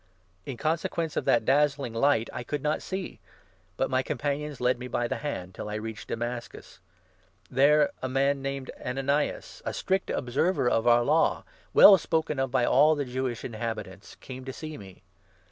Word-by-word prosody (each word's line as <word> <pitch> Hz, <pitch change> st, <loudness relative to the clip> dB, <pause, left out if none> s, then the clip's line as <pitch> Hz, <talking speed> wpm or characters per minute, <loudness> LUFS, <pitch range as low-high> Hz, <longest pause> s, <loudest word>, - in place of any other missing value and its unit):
In 130 Hz, -, -5 dB
consequence 160 Hz, +1 st, -1 dB
n -, -, +1 dB
of -, -, -17 dB
that 115 Hz, -2 st, +3 dB
dazzling 140 Hz, -2 st, +2 dB
light 115 Hz, -1 st, +2 dB
I -, -, -4 dB
could 145 Hz, +3 st, -4 dB
not 150 Hz, +1 st, 0 dB
see, 190 Hz, -1 st, -5 dB, 0.6 s
but 135 Hz, -, +1 dB
my 130 Hz, -1 st, +1 dB
companions 145 Hz, +1 st, -3 dB
led 125 Hz, 0 st, +1 dB
me 125 Hz, -, -6 dB
by 120 Hz, -1 st, -1 dB
the -, -, -2 dB
hand, 95 Hz, -11 st, -5 dB
till 105 Hz, -, -6 dB
I 105 Hz, -, -4 dB
reached 110 Hz, 0 st, -6 dB
Damascus. 120 Hz, +1 st, -6 dB, 0.7 s
There 145 Hz, +3 st, +4 dB
a 130 Hz, -, -2 dB
man 135 Hz, +1 st, +1 dB
named 135 Hz, -1 st, -4 dB
12 125 Hz, +1 st, -5 dB
Ananias, 140 Hz, +2 st, -1 dB
a -, -, -3 dB
strict 190 Hz, +1 st, -1 dB
observer 135 Hz, +5 st, 0 dB
of 115 Hz, -1 st, +1 dB
our 120 Hz, 0 st, +5 dB
Law, 155 Hz, +6 st, +2 dB, 0.3 s
well 195 Hz, -2 st, +9 dB
spoken 160 Hz, -4 st, -1 dB
of 135 Hz, 0 st, 0 dB
by 125 Hz, -1 st, +2 dB
all 150 Hz, +6 st, +5 dB
the 145 Hz, -1 st, -2 dB
Jewish 125 Hz, -1 st, -3 dB
inhabitants, 110 Hz, -4 st, -6 dB
came 130 Hz, 0 st, -9 dB
to 130 Hz, -, -6 dB
see 155 Hz, +2 st, -7 dB
me. 95 Hz, -4 st, -13 dB
135 Hz, 180 wpm, -27 LUFS, 120-150 Hz, 0.7 s, well